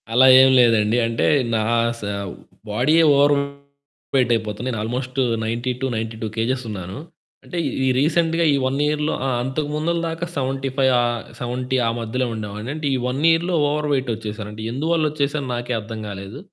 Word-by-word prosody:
అలా 130 +2 +6
ఏం 130 - +6
లేదండి. 115 -2 +4
అంటే 115 0 0 0.3
నా 110 - +1 0.4
స - - -14 0.7
బాడీయే 150 +10 +3
ఓవర్ 145 +1 +5 0.8
వెయిట్ 125 -3 +3
అయిపోతున్న. 110 +1 -4
నేను 115 -4 -3
ఆల్మోస్టు 125 +3 -2 0.2
90-92 115 -1 -3
కేజెస్ 130 +3 0
ఉన్నాను. 95 -1 -6 0.5
అంటే 180 - -6 0.3
ఈ - - +2
రీసెంట్‌గా 165 +3 +2
ఈ - - +3
1 135 +2 -1
ఇయర్‌లో 150 +1 0
ఆ! - - +1
అంతకు 145 +3 -2
ముందుల 160 +3 0
దాకా 165 +1 -3
75 135 0 0
ఆహ్, 120 -1 -1 0.2
70 125 +1 -2
ఆ - - +2
మధ్యలో 120 +3 -2
ఉండేవాడిని. 105 +1 -6
అంటే 155 -1 -3
ఈ - - +1
1 130 +3 -2
ఇయర్‌లో 170 +2 +2
ఓవర్ 150 +1 -1
వెయిట్ 130 -2 0
ఓచ్చేసాను. 105 -1 -6
అంటే 110 +1 -8
ఎందువల్లొచ్చేసానో 150 -1 0
నాకే 120 +1 -3
అర్థం 110 +1 -7
కాలేదు. 100 +5 -7
130 Hz, 155 wpm, -21 LUFS, 115-145 Hz, 0.8 s, అలా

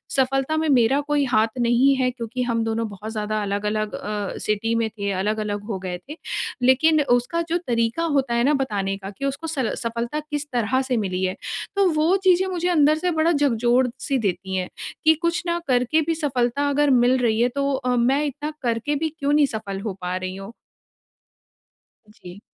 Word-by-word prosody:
सफलता 270 +3 +1
में 315 0 0
मेरा 265 +1 +4
कोई 295 -1 +2
हाथ 225 -3 +3
नहीं 240 +4 +4
है 255 -1 +1
क्योंकि 240 0 -5
हम 230 -2 0
दोनों 225 0 -1
बहुत 210 +2 -8
ज़्यादा 215 0 -2
अलग-अलग 210 +1 -2
अ, 205 -1 -4
सिटी 215 +2 -1
में 230 -1 0
थे, 200 -2 -4
अलग-अलग 205 +1 -2
हो 200 - -2
गए 180 -1 -4
थे। 305 - -7 0.4
लेकिन 295 +5 +4
उसका 245 +8 +2
जो 340 - +2
तरीका 230 +5 0
होता 270 -3 +1
है 235 0 +2
ना 290 - +3
बताने 205 -8 -1
का 195 0 -8
कि 275 - -3
उसको 275 +4 -3
सल 275 -7 -1
सफलता 235 +5 -3
किस 295 -1 -4
तरह 245 +2 +1
से 260 -2 -1
मिली 190 -3 -2
है। 185 0 0 0.4
तो 400 0 +3
वो 315 +4 +3
चीज़ें 375 0 +4
मुझे 355 -2 -2
अंदर 305 -3 +4
से 355 +2 0
बड़ा 320 +1 +2
झकझोर-सी 250 -1 +1
देती 190 -2 -2
हैं, 185 -1 -2 0.3
कि 315 - +6
कुछ 340 +1 0
ना 340 0 0
करके 250 +4 +2
भी 330 - +1
सफलता 280 -2 0
अगर 290 +1 +2
मिल 250 0 +4
रही 230 -3 +1
है 245 - +3
तो 280 - 0
अ, 255 -2 -1
मैं 260 +5 +2
इतना 295 +2 -4
करके 235 +4 -1
भी 320 +2 -1
क्यों 285 0 0
नहीं 295 -1 +5
सफल 220 -6 -5
नहीं 195 - -5
हो 215 -4 -3
पा 180 0 -2
रही 185 0 -5
हूँ? 195 +2 -8 1.6
जी। 180 -2 -12
245 Hz, 195 wpm, -23 LUFS, 215-290 Hz, 1.6 s, कि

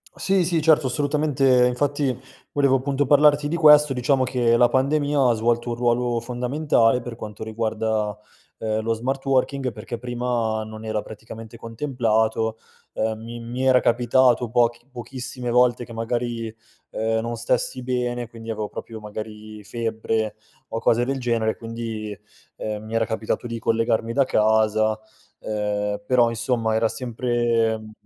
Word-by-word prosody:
Sì, 190 -3 +1
sì, 165 -2 +1
certo, 155 -3 +4
assolutamente. 135 -2 +2
Infatti 135 0 0 0.4
volevo 140 -2 +3
appunto 140 +1 -1
parlarti 145 +1 +5
di 170 - -1
questo. 150 -3 +7
Diciamo 130 +1 +1
che 120 -2 +2
la 120 0 +5
pandemia 140 0 +2
ha - - +4
svolto 120 +2 0
un 120 - -1
ruolo 120 0 +1
fondamentale 125 0 +1
per 120 -1 -7
quanto 105 -1 -8
riguarda, 110 -1 -2 0.4
uhm, 110 0 -1
lo 115 +1 0
smart 130 +4 -3
working, 135 -1 +1
perché 115 +2 -7
prima 120 -3 -1
non 110 0 -9
era 110 -1 -1
praticamente 110 +1 -10
contemplato. 110 -2 0 0.4
Uhm, 110 0 -1
mi 120 +1 -7
mi 125 +3 -3
era 130 -1 +6
capitato 120 0 +3
pochi 120 +1 +1
pochissime 125 0 -6
volte 125 0 +3
che 115 - -11
magari, 115 -1 -3 0.4
uhm, 110 0 0
non 115 +1 -3
stessi 125 +2 -1
bene, 125 -1 -2
quindi 115 -1 -10
avevo 105 -2 -3
proprio 110 -1 -8
magari 105 0 -8
febbre 110 -1 -2 0.3
o 115 - -3
cose 120 +2 +2
del 135 0 -2
genere, 115 -3 0
quindi, 115 -2 -5 0.4
uhm, 105 0 -5
mi 110 +1 -5
era 115 0 +2
capitato 110 +1 -3
di 115 -1 -4
collegarmi 115 0 0
da 140 - +4
casa, 110 -1 +2 0.4
uhm, 105 -1 -2
però 120 -2 +4
insomma 115 -1 -1
era 110 0 +3
sempre 115 -1 0
mhmm, 110 0 -11
120 Hz, 150 wpm, -23 LUFS, 110-125 Hz, 0.4 s, questo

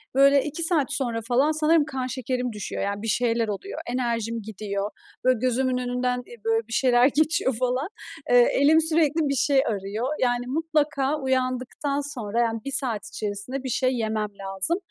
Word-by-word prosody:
böyle, 275 0 +5
2 305 +3 -1
saat 305 -4 +2
sonra 235 -5 -2
falan 255 +7 +2
sanırım 310 0 +3
kan 260 -4 -4
şekerim 250 -1 -3
düşüyor. 205 -1 -4
Yani 200 +1 -3
bir 225 - -5
şeyler 230 -1 +1
oluyor, 210 - -5
enerjim 230 -2 -2
gidiyor; 200 -1 -4 0.3
böyle, 255 -3 +3
gözümün 255 0 +1
önünden, 250 0 -1
eee, 240 - -12
böyle, 225 0 +1
bir 230 - -7
şeyler 245 +1 +4
geçiyor 295 -3 +1
falan. 255 +5 0 0.4
Eee, - - +6 0.2
elim 315 -3 +5
sürekli 320 -1 +2
bir 275 - 0
şey 275 +1 +3
arıyor. 210 +3 -2
Yani 245 -1 0
mutlaka 295 -1 0
uyandıktan 260 +2 -1
sonra, 230 -2 -3
yani 230 -1 +1
1 275 - -3
saat 255 0 0
içerisinde 215 +4 -4
bir 260 - -4
şey 255 +2 +1
yemem 215 -2 -1
lazım. 195 - +1
255 Hz, 170 wpm, -25 LUFS, 230-280 Hz, 0.4 s, Eee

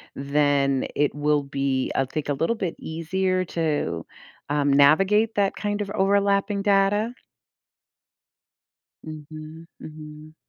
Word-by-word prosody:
then 140 -1 +1
it 145 -1 +1
will 150 0 +1
be, 135 -1 -1
I 135 - +2
think, 145 +3 -5
a 145 - 0
little 165 +11 0
bit 180 -5 -3
easier 185 +3 -2
to, 150 - -2 0.4
um, 145 -1 +1
navigate 195 +10 +4
that 200 -1 +1
kind 205 0 -2
of 200 - -4
overlapping 200 +1 +1
data. 205 +3 +2 1.9
Mhm. 155 +1 -10
Mhm. 155 0 -11
155 Hz, 115 wpm, -24 LUFS, 145-195 Hz, 1.9 s, navigate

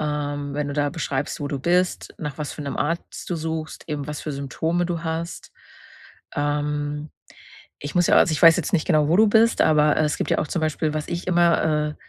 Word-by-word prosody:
Ähm, 145 -1 -3
wenn 145 0 -2
du - - -3
da 145 -1 +1
beschreibst, 145 -2 -3
wo 145 - -3
du 140 - -3
bist, 180 +5 0
nach 150 -3 -5
was 150 -1 -4
für 150 - -7
'nem 140 - -4
Arzt 165 +3 -3
du 175 - -2
suchst, 160 0 -5
eben 145 -2 -3
was 150 -1 -5
für 155 - -4
Symptome 160 +5 -1
du 170 -2 -3
hast. 165 +1 -4 0.8
Ähm, 145 0 -2 0.7
ich 145 - -7
muss 175 -1 +3
ja - - +4
also, 165 - +5
ich 155 - -2
weiß 165 -1 +9
jetzt 180 - -3
nicht 160 - +1
genau, 155 -4 +3
wo 165 - +3
du 220 +2 +6
bist, 225 +2 +4
aber 150 -1 +4
es 150 -1 0
gibt - - -2
ja - - +2
auch 150 - -1
zum 170 - -2
Beispiel, 155 0 -1
was 155 -1 -3
ich 170 +1 -4
immer, 170 -4 +2
äh, - - -9
155 Hz, 225 wpm, -23 LUFS, 145-165 Hz, 0.8 s, weiß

